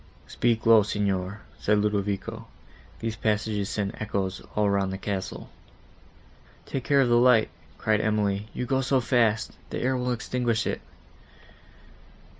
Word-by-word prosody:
"Speak 115 -2 0
low, 115 -1 +8
Signor," 100 -1 -1 0.2
said 105 0 +2
Ludovico, 105 +2 -1 0.5
"these 115 -1 -2
passages 105 -2 -1
send 100 -2 -2
echoes 95 -3 -2
all 105 -1 +2
round 100 -1 +1
the 95 - -4
castle." 95 -1 -5 1.1
"Take 135 - -4
care 140 -1 +4
of 130 - +3
the 120 0 +4
light," 120 -3 +5 0.3
cried 110 -1 +1
Emily, 105 -1 0
"you 125 - -3
go 130 +2 +1
so 135 0 +2
fast, 115 -3 +2
that - - -9
the - - -3
air 130 +1 +1
will 125 0 -1
extinguish 120 -1 -1
it." - - -2
110 Hz, 145 wpm, -26 LUFS, 100-120 Hz, 1.1 s, low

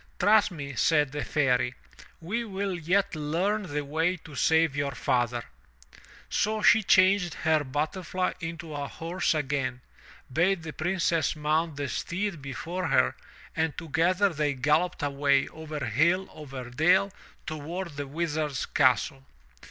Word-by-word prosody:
'Trust 205 +3 +4
me/* 140 -6 -7
said 150 +2 +2
the 145 0 -3
Fairy, 125 -4 +1 0.4
we 210 +9 -2
will 200 -2 -3
yet 190 +5 +1
learn 170 +8 0
the 145 0 -2
way 165 +5 0
to 155 -2 -14
save 160 +1 +3
your 140 -1 -1
father/' 120 -1 0 0.8
So 215 0 0
she 220 - +7
changed 185 -2 +4
her 155 -2 +2
butterfly 155 +6 -2
into 165 -2 -6
a 145 -1 -3
horse 170 +2 -1
again, 135 -4 -2 0.5
bade 175 +2 +2
the 160 -1 -6
Princess 170 -3 0
mount 155 +1 0
the 140 0 -3
steed 185 +2 -3
before 160 +7 -4
her, - - +3 0.4
and 160 -2 -1
together 175 +6 +2
they 150 -4 -1
galloped 150 +6 +1
away, 140 -1 +2
over 155 -3 -6
hill, 170 - +2
over 135 -5 -8
dale, 185 +8 +3 0.3
toward 165 +4 -5
the 145 0 -4
Wizard's 155 -2 -2
castle. 135 0 +1
160 Hz, 135 wpm, -27 LUFS, 145-180 Hz, 0.8 s, she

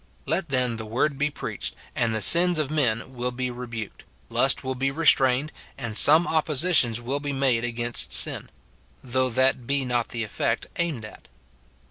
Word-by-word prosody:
Let, 185 -4 -2
then, 125 -3 -1
the 110 - -7
word 135 +5 -2
be 145 +1 0
preached, 145 - -6 0.2
and 115 -2 -1
the 110 - +3
sins 175 0 +8
of 150 -2 -2
men 130 -4 -2
[will 125 0 -4
be] 125 0 -5
rebuked, 115 -3 -9 0.3
lust - - +1
will 130 - -4
be 135 +1 -3
restrained, 135 -2 +2 0.3
and 115 -5 -7
some 155 +8 +7
oppositions 155 -6 +2
will 130 +4 -5
be 145 -1 -6
made 130 -4 -1
against 120 0 0
sin; - - -1 0.5
though 130 0 -2
that 130 0 -1
be 140 -1 -2
not 120 -2 -3
the 120 -2 -5
effect 105 -5 -4
aimed 155 -10 -3
at. 105 - -15
130 Hz, 170 wpm, -23 LUFS, 120-145 Hz, 0.5 s, sins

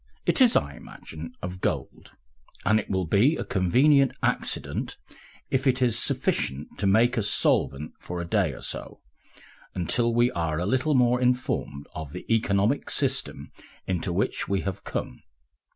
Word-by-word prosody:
It - - +2
is, 245 -3 +6
I 70 - +1
imagine, 80 +1 -10
of 90 +1 -6
gold, - - -3 0.5
and 110 0 +4
it - - -7
will 95 -2 0
be 110 - +3
a - - -3
convenient 130 - +3
accident - - -1 0.5
if 135 +1 +1
it 130 0 +2
is 120 -3 +2
sufficient 70 +3 -1
to 100 - +1
make 115 +5 +3
us 105 - 0
solvent 75 -7 +1
for 90 0 -6
a 85 - -3
day 85 - +1
or - - -11
so, - - -6 0.7
until 115 +7 +1
we 120 +2 +3
are 80 -5 -2
a 90 - -1
little 130 +7 +1
more 125 0 +3
informed 125 - -1
of 80 -2 -7
the 90 - -7
economic 105 +3 +1
system - - -2 0.3
into 90 0 -2
which 95 +4 -1
we 100 0 0
have 100 +1 -5
come. - - -5
100 Hz, 160 wpm, -26 LUFS, 85-125 Hz, 0.7 s, is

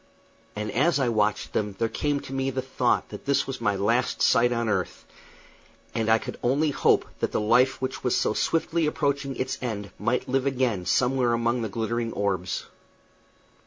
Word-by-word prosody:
And 105 0 -3
as 145 +6 +2
I 130 -3 +2
watched 105 -2 0
them 105 -2 -1
there 115 - +1
came 140 +5 -1
to 135 - -9
me 135 0 0
the 130 0 -3
thought 125 -2 0
that - - -10
this 140 0 +2
was 130 -2 -6
my 105 -3 +1
last 115 +6 +1
sight 120 +1 +4
on 120 -1 0
earth, 95 -4 -2 0.9
and 110 -1 -1
I 110 - +6
could - - -7
only 145 +5 +2
hope - - +3
that - - -1
the - - 0
life 125 +5 +3
which 130 0 -4
was 125 - +2
so - - +1
swiftly 165 +4 0
approaching 140 -2 -1
its 130 - -3
end 105 -5 -4
might 115 +4 0
live 135 +1 0
again 125 -9 0
somewhere 125 -1 +2
among 120 +1 +1
those 110 - -2
glittering 115 +2 -2
orbs. 95 -3 -2
120 Hz, 185 wpm, -26 LUFS, 110-135 Hz, 0.9 s, I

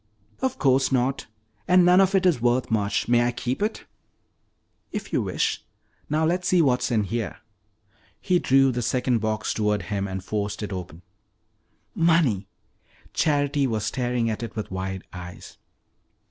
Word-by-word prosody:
"Of 260 0 -1
course 135 -1 +2
not! 130 +1 0 0.4
And 180 0 +5
none 180 +2 +6
of 195 +1 +2
it 190 -1 +3
is 165 -10 +3
worth 120 0 +1
much. 100 -2 0
May 120 0 +4
I - - +1
keep 125 +4 -3
it?" 215 +2 -2 1.1
"If - - -6
you - - +2
wish. - - -1 0.5
Now 155 +2 +1
let's 180 +2 0
see 185 - +3
what 130 -6 +3
is - - -1
in 110 -4 +1
here." 115 +3 -3 0.8
He 180 -1 +2
drew 135 -2 +4
the 125 0 -2
second 125 +1 +1
box 110 0 -1
toward 105 -2 0
him 100 +1 -2
and 95 -1 -5
forced 105 +1 -3
it 105 - -4
open. 90 -2 -7 0.9
"Money!" 160 - +2 0.7
Charity 145 -2 +1
was 110 -3 -2
staring 125 -2 -1
at 110 0 -2
it 115 - -6
with 110 -3 -5
wide 95 0 -4
eyes. 90 -1 -10
120 Hz, 160 wpm, -24 LUFS, 105-145 Hz, 1.1 s, none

